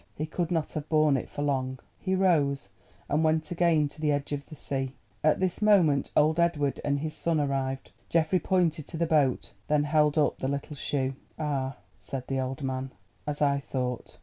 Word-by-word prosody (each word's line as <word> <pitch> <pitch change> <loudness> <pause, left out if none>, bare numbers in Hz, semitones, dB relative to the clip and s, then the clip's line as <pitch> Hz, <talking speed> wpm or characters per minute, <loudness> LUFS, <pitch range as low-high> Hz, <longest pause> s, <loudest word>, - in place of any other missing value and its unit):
He 155 - -2
could 165 +1 -2
not 165 -4 -1
have 155 0 -5
borne 155 -2 +4
it 130 - -3
for 145 - -4
long. 130 -2 -1 0.2
He 190 -1 0
rose 145 - +2 0.4
and 150 +3 +1
went 155 0 +1
again 170 -3 +3
to 150 +2 -12
the 150 -1 +2
edge 145 0 -1
of 140 -1 -4
the 155 - -10
sea. 135 -2 -3 0.3
At 155 0 +4
this 185 0 -1
moment 180 -10 +4
old 155 +2 +4
Edward 150 -5 +1
and 140 -1 0
his 155 0 -3
son 165 -2 0
arrived. 135 -2 -2 0.2
Geoffrey 165 +2 +2
pointed 170 -6 +1
to 165 - -6
the 170 - +1
boat, 150 -6 +1
then 150 -1 +3
held 150 0 +3
up 150 - +2
the 130 - -1
little 140 +2 -3
shoe. 135 -1 -1 0.2
"Ah," 140 -3 -2 0.2
said 130 -2 -5
the 135 -1 -2
old 130 +2 -3
man, 130 0 -2 0.4
"as 150 0 -1
I 140 -1 +3
thought. 125 -3 -4
150 Hz, 200 wpm, -28 LUFS, 135-160 Hz, 0.4 s, borne